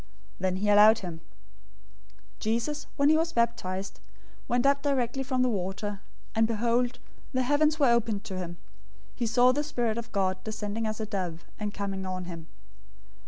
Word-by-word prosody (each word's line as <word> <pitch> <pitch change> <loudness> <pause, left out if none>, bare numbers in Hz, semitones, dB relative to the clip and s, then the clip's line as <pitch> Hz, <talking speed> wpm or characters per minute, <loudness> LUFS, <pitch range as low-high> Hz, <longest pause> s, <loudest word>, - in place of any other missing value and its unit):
Then 185 -1 0
he 200 +3 -1
allowed 210 +2 +8
him. 165 -2 -7 1.2
003:016 - - -31
Jesus, 235 +7 -1
when 280 +1 +4
he 315 - +5
was 330 +1 0
baptized, 200 -5 -1 0.5
went 245 +1 +1
up 280 0 +4
directly 270 -2 0
from 255 -1 0
the - - +3
water: 200 -1 -3 0.3
and 225 0 +3
behold, 235 +2 +1 0.4
the 255 0 +2
heavens 300 +3 +3
were 275 -5 +4
opened 225 -3 +1
to 195 -4 -6
him. 175 -1 -5 0.6
He 235 - -2
saw 245 +3 +5
the 290 +3 0
Spirit 235 -6 -1
of 235 0 -8
God 190 -2 0
descending 220 0 -3
as 215 0 -3
a 220 - -2
dove, 180 -5 -4
and 210 -1 -2
coming 195 -2 -4
on 185 -1 -4
him. 165 -2 -8
225 Hz, 170 wpm, -28 LUFS, 195-250 Hz, 1.2 s, allowed